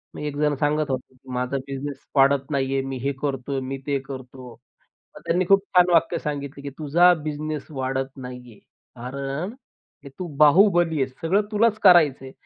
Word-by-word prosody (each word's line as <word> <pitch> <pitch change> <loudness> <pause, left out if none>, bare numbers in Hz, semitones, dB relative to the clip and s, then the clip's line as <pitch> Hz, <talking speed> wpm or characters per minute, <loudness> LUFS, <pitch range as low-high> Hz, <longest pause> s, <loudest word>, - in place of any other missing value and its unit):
मी 150 - -5
एकजण 150 0 0
सांगत 150 0 0
होतो 130 0 -5
की, 130 0 -14
"माझा 125 +2 -1
बिझनेस 135 +1 -6
वाढत 135 0 +3
नाही 135 -1 0
आहे, 135 - +1
मी 135 -1 -4
हे 140 - +1
करत 135 -2 -3
आहे, 135 -1 -1
मी 130 +1 -5
ते 140 -1 0
करतो." 130 -1 -9 0.7
मग - - -10
त्यांनी 180 +2 +1
खूप 195 0 +5
छान 180 0 +6
वाक्य 165 -1 +3
सांगितलं 140 -1 -5
की, 140 - -6
"तुझा 170 +4 +5
बिझनेस 150 -1 -4
वाढत 135 -1 -3
नाही 125 -2 -9
आहे. 105 - -18 0.4
कारण 140 - -5 0.5
हे 140 - -8
तू 185 - -4
बाहुबली 165 +1 +4
आहेस 130 -1 -3
सगळं 190 +6 +2
तुलाच 220 0 +2
करायचं 160 -8 +5
आहे, 130 - -10
140 Hz, 185 wpm, -23 LUFS, 135-155 Hz, 0.7 s, छान